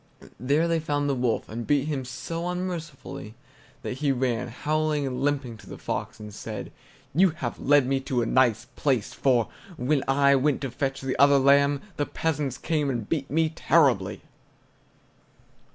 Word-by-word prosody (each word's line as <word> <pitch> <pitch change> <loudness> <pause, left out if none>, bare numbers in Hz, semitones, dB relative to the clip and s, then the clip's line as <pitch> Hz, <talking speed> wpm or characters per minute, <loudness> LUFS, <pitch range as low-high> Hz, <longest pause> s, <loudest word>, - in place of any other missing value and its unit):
There 145 +6 +2
they 165 -1 +1
found 145 -2 -1
the 140 - +1
wolf, 125 -3 0
and 115 +1 -6
beat 145 -2 +2
him 140 -4 -2
so 165 +8 -5
unmercifully 170 - -5 0.5
that 125 - -4
he 145 -2 +2
ran, 125 -2 0
howling 150 +4 -1
and 125 -2 -3
limping, 135 -5 -1
to - - -15
the - - -8
fox, - - -4
and 105 -1 -9
said: 110 0 -6 0.4
"You 185 +6 +5
have 135 -7 -5
led 145 -1 +4
me 135 +1 +1
to 130 -2 -1
a - - -1
nice 120 -2 +2
place, 130 -7 0
for, 125 -4 +2 0.3
when 135 +3 +1
I 140 +1 +4
went 140 +1 +1
to 135 -3 -3
fetch 135 +1 -2
the 135 -1 -2
other 140 0 +7
lamb, 140 +1 +4 0.2
the 145 - 0
peasants 145 -5 -2
came 150 -3 0
and 120 -5 -3
beat 145 -4 -2
me 160 +1 +2
terribly!" 140 - +2
140 Hz, 170 wpm, -26 LUFS, 125-150 Hz, 0.5 s, other